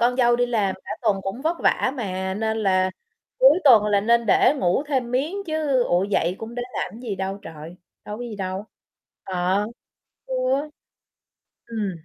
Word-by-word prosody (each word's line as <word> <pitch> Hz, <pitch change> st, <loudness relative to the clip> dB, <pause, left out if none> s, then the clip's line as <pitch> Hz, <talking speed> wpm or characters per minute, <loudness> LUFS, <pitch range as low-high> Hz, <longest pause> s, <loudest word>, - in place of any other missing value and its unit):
con 245 Hz, +1 st, +2 dB
dâu 240 Hz, -2 st, +4 dB
đi 245 Hz, 0 st, +2 dB
làm 210 Hz, -6 st, 0 dB
cả -, -, -10 dB
tuần 215 Hz, -4 st, +2 dB
cũng 195 Hz, +8 st, -5 dB
vất 335 Hz, +2 st, 0 dB
vả 260 Hz, -, +2 dB
mà, 190 Hz, -4 st, -3 dB
nên 220 Hz, +1 st, -1 dB
là 185 Hz, -1 st, +2 dB, 0.5 s
cuối -, -, +7 dB
tuần 225 Hz, -6 st, +7 dB
là 205 Hz, -1 st, +3 dB
nên 235 Hz, +2 st, +2 dB
để 250 Hz, +7 st, +4 dB
ngủ 180 Hz, +3 st, +1 dB
thêm 260 Hz, -5 st, -1 dB
miếng 280 Hz, +9 st, -1 dB
chứ, 305 Hz, -5 st, +1 dB
ủa, 175 Hz, +1 st, +2 dB
dậy 185 Hz, -3 st, 0 dB
cũng 225 Hz, +1 st, -7 dB
để 245 Hz, -, -3 dB
làm -, -, -3 dB
cái 225 Hz, -, -11 dB
gì 225 Hz, -6 st, -4 dB
đâu 190 Hz, +1 st, -3 dB
trời, 160 Hz, +2 st, -10 dB, 0.3 s
đâu 210 Hz, -, -6 dB
có -, -, -5 dB
gì 235 Hz, -3 st, -6 dB
đâu. 190 Hz, 0 st, -4 dB, 0.6 s
Ờ, 185 Hz, +2 st, 0 dB, 0.6 s
ừ. 260 Hz, -, -4 dB, 1.3 s
Ừm. 215 Hz, -4 st, -2 dB
220 Hz, 185 wpm, -23 LUFS, 190-245 Hz, 1.3 s, cuối